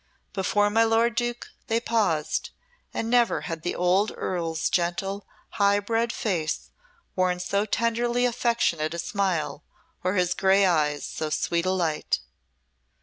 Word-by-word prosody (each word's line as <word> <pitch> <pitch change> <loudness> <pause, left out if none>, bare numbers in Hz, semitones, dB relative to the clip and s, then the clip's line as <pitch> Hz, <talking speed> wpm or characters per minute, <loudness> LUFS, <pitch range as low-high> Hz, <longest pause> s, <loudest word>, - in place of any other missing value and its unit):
Before 205 +1 +1
my 225 +2 +4
lord 225 +1 +3
Duke 240 0 -2 0.2
they 225 +1 +2
paused, 205 -10 0 0.4
and 225 - -3
never 240 0 +3
had 165 -3 -5
the 175 - -2
old 185 +4 +2
Earl's 165 -3 -2
gentle, 190 +3 -1 0.3
high 200 0 +5
bred 225 +3 0
face 170 -10 -2 0.4
worn 180 -1 +1
so 200 +3 0
tenderly 235 +3 +1
affectionate 230 -10 0
a - - -4
smile, 170 -7 -1 0.4
or 185 +2 0
his 180 -1 +2
grey 195 +1 +4
eyes 150 -5 +1
so 155 - -4
sweet 170 +3 0
a - - +3
light. 170 -5 0
195 Hz, 140 wpm, -26 LUFS, 170-225 Hz, 0.4 s, high